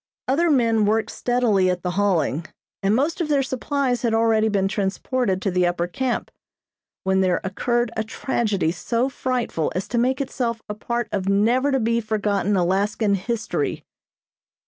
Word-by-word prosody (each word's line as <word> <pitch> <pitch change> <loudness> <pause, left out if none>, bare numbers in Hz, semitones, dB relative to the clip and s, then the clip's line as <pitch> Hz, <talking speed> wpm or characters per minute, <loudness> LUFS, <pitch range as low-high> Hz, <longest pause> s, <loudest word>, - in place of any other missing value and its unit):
Other 330 +6 +2
men 230 -6 +3
worked 220 +1 +1
steadily 230 -7 +2
at 180 -1 -2
the 180 - -1
hauling, 175 -5 0 0.3
and 195 +2 +2
most 300 +8 0
of 315 - -2
their 280 -2 +3
supplies 260 -1 -1
had 230 -2 +1
already 225 -1 +3
been 195 -2 +1
transported 200 +1 -1
to 195 - 0
the 180 0 +2
upper 175 0 0
camp; 245 +8 -2 0.7
when 190 0 +2
there 185 -1 +2
occurred 240 +5 0
a 220 - 0
tragedy 220 -6 -1
so 230 +9 -1
frightful 250 - -2
as 185 - -2
to 240 - 0
make 260 +2 +1
itself 240 -4 -2
a 210 - -3
part 235 +2 -3
of 195 -1 -1
never 235 +8 +3
to 270 - +2
be 230 0 +1
forgotten 205 -2 0
Alaskan 200 +4 +1
history. 215 +3 -2
220 Hz, 165 wpm, -23 LUFS, 195-245 Hz, 0.7 s, men